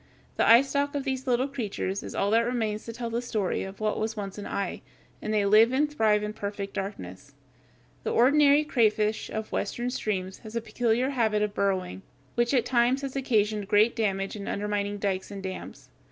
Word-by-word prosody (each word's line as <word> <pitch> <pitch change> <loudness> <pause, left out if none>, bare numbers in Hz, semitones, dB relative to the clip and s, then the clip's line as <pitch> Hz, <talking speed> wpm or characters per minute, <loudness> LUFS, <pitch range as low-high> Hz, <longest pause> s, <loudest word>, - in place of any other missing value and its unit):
The - - +3
eyestalk 280 +4 +4
of 280 - -1
these 265 0 -3
little 250 +1 +2
creatures 210 -7 -3
is - - -8
all 200 +1 +1
that 230 +1 +4
remains 220 -3 -2
to 230 - -5
tell 235 0 -5
the 235 +1 -1
story 215 -6 -1
of 190 +1 -7
what 215 -1 -1
was 220 +1 -2
once 200 0 -5
an 205 - -6
eye, 200 -2 -3 0.4
and 215 - -3
they 210 -2 +2
live 215 +4 +6
and 285 +3 +2
thrive 215 -5 +3
in 210 0 -3
perfect 200 -1 -5
darkness. 140 - -6 0.7
The - - -3
ordinary 285 +4 +5
crayfish 220 -6 +1
of 220 0 -5
Western 245 +1 -2
streams 190 -6 -3
has 220 -1 -10
a - - +1
peculiar 240 +3 0
habit 220 -5 +1
of 210 -1 -2
burrowing, 185 - -1 0.3
which 240 0 +1
at 255 -4 +2
times 250 +2 +2
has 275 -1 -4
occasioned 215 -6 +1
great 210 +3 +4
damage 195 -3 -1
in 200 -1 -7
undermining 205 0 -2
dikes 195 -2 -2
and 200 -1 -7
dams. 185 -1 -7
215 Hz, 195 wpm, -27 LUFS, 200-245 Hz, 0.7 s, live